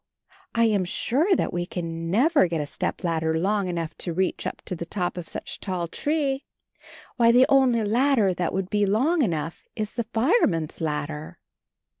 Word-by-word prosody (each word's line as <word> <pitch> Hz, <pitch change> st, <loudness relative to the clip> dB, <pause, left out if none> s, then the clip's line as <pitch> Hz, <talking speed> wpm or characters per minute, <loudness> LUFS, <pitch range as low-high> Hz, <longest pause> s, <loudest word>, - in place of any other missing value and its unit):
I 230 Hz, -, +4 dB
am 210 Hz, -4 st, +3 dB
sure 285 Hz, -, +1 dB
that -, -, -1 dB
we 175 Hz, 0 st, -2 dB
can 165 Hz, -2 st, -4 dB
never 265 Hz, -, +4 dB
get 165 Hz, -2 st, -2 dB
a 150 Hz, -, -1 dB
stepladder 160 Hz, +1 st, -1 dB
long 200 Hz, +3 st, 0 dB
enough 170 Hz, -3 st, -3 dB
to 175 Hz, -, -3 dB
reach 185 Hz, +2 st, -1 dB
up -, -, -6 dB
to 180 Hz, -, -4 dB
the 170 Hz, 0 st, -6 dB
top 180 Hz, -1 st, -2 dB
of 175 Hz, -2 st, -7 dB
such -, -, -5 dB
a -, -, -38 dB
tall 180 Hz, -3 st, -3 dB
tree. 285 Hz, -, -1 dB, 0.7 s
Why, 235 Hz, -1 st, +5 dB
the 250 Hz, +2 st, +6 dB
only 260 Hz, -5 st, +4 dB
ladder 225 Hz, -2 st, +3 dB
that 175 Hz, -1 st, -1 dB
would 190 Hz, 0 st, -3 dB
be 205 Hz, -1 st, +2 dB
long 275 Hz, -, +2 dB
enough 165 Hz, -, -2 dB
is 215 Hz, -2 st, -3 dB
the 235 Hz, -1 st, -2 dB
fireman's 225 Hz, -, +1 dB
ladder!" 150 Hz, 0 st, -3 dB
195 Hz, 180 wpm, -25 LUFS, 170-240 Hz, 0.7 s, the